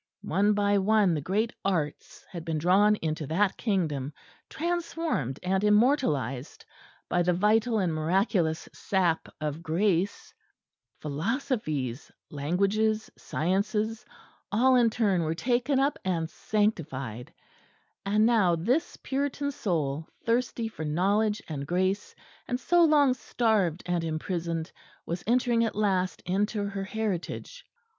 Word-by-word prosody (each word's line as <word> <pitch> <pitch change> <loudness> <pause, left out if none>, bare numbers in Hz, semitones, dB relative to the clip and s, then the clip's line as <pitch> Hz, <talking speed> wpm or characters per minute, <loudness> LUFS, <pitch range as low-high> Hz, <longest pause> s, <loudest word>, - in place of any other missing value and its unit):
One 200 +5 +2
by 205 0 +2
one 205 -2 +3
the 150 - -1
great 210 +9 0
arts 165 -7 -2
had 170 -3 -6
been 165 -1 -2
drawn 195 +6 +4
into 155 -2 -2
that 190 +6 +1
Kingdom, 155 - -1 0.4
transformed 330 - -2
and 190 +2 +1
immortalised 210 - +1 0.4
by 175 - +1
the 180 +1 +2
vital 215 +5 +2
and 180 -5 +1
miraculous 165 0 +1
sap 180 -4 0
of 155 +1 -3
grace; 180 +3 0 0.7
philosophies, 155 - -2 0.2
languages, 200 +9 0
sciences, 210 +6 -1 0.5
all 255 +5 +4
in 240 -2 +5
turn 205 -6 +1
were 160 0 -1
taken 245 - +1
up 275 +2 +1
and 170 -3 -1
sanctified; 140 - -2 0.7
and 210 +2 +3
now 215 -7 +4
this 240 - 0
Puritan 285 +1 -1
soul, 160 - -2 0.2
thirsty 230 -1 0
for 215 -8 -7
knowledge 200 +7 +1
and 140 -3 -5
grace, 185 +4 -1 0.3
and 245 0 -1
so 345 +4 +4
long 295 -5 +5
starved 215 -9 0
and 175 -1 -1
imprisoned, 165 0 -3 0.3
was 170 +1 -4
entering 240 -1 +3
at 225 - -1
last 190 -3 0
into 205 +3 0
her 195 -1 -4
heritage. 220 - -4
195 Hz, 120 wpm, -28 LUFS, 165-220 Hz, 0.7 s, in